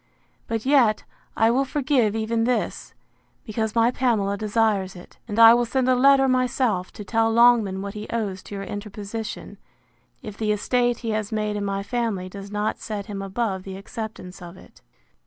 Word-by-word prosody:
—But 225 0 -3
yet, 260 -6 +3 0.3
I 225 +1 +4
will 265 +3 +2
forgive 265 -5 +1
even 225 +1 0
this, 250 0 -2 0.5
because 220 -1 -3
my 230 +1 +4
Pamela 220 -6 0
desires 210 -2 0
it; 175 - -14
and 210 -1 -5
I 230 0 +9
will 240 0 +3
send 255 +2 0
a 255 - +5
letter 270 +1 +5
myself, 250 -7 0
to 210 - -8
tell 225 +1 +1
Longman 225 -5 +4
what 200 0 -5
he 210 0 -7
owes 205 -5 -3
to 205 - -8
your 195 - -5
interposition, 210 +2 -7 0.6
if 210 - -7
the 215 -1 0
estate 240 +3 0
he 225 - 0
has 215 0 -2
made 210 -1 -1
in 205 - -2
my 195 0 -2
family 210 -5 -2
does 200 +1 -9
not 210 +1 -2
set 205 -2 -5
him 200 -1 -6
above 195 0 -2
the 190 0 -8
acceptance 200 -3 -8
of 175 +1 -10
it. - - -18
220 Hz, 180 wpm, -24 LUFS, 200-235 Hz, 0.6 s, I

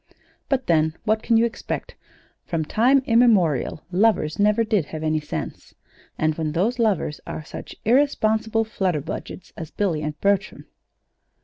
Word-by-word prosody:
"But 265 -2 0
then, 160 -1 +2
what 220 0 +1
can 230 0 +2
you 230 - +4
expect? 235 - -5 0.5
From 160 -2 -2
time 260 - +3
immemorial 200 - +3
lovers 185 -5 +2
never 210 +2 +3
did 210 -7 +1
have 155 +1 -7
any 155 0 +1
sense; 150 - -7 0.4
and 155 0 +1
when 155 -1 -3
those 225 +10 0
lovers 205 -9 0
are 155 - -5
such - - -9
irresponsible 225 -3 +2
flutterbudgets 185 -4 -4
as 160 -2 -7
Billy 175 -7 -1
and 150 0 -4
Bertram 200 -1 0
200 Hz, 140 wpm, -23 LUFS, 155-225 Hz, 0.5 s, you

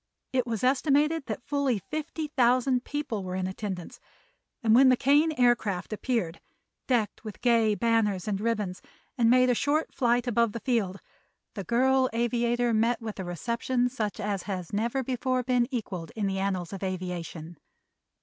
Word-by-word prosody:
It 255 -2 +1
was 225 -2 -3
estimated 285 +3 +2
that 270 - -4
fully 280 -4 0
fifty 310 - -5
thousand 250 -1 +2
people 285 -9 -3
were 185 0 -4
in 185 0 -1
attendance, 190 -2 -5 0.6
and 220 -1 +4
when 260 +3 +7
the 255 - +4
Kane 290 +5 +4
Aircraft 235 -8 +1
appeared, 215 -7 -2 0.5
decked 235 -5 0
with 215 -3 -8
gay 230 -3 +3
banners 215 -5 +1
and 200 -1 -1
ribbons, 210 -5 -2 0.3
and 230 -2 +3
made 255 +1 +5
a - - +4
short 290 +6 0
flight 245 -1 +1
above 235 -2 +1
the 230 - -4
field, 210 -7 -1 0.5
the 200 - -5
girl 260 +3 +3
aviator 240 0 +1
met 230 +2 +2
with 220 -3 -6
a - - -2
reception 235 +7 -1
such 220 -5 -3
as 200 -2 -2
has 185 -3 -4
never 235 +6 0
before 255 0 -1
been 245 -1 +2
equaled 190 -9 -4
in 215 -2 -1
the 195 -1 -1
annals 190 -2 -2
of 195 - -6
aviation. 175 -3 -5
235 Hz, 165 wpm, -28 LUFS, 200-255 Hz, 0.6 s, when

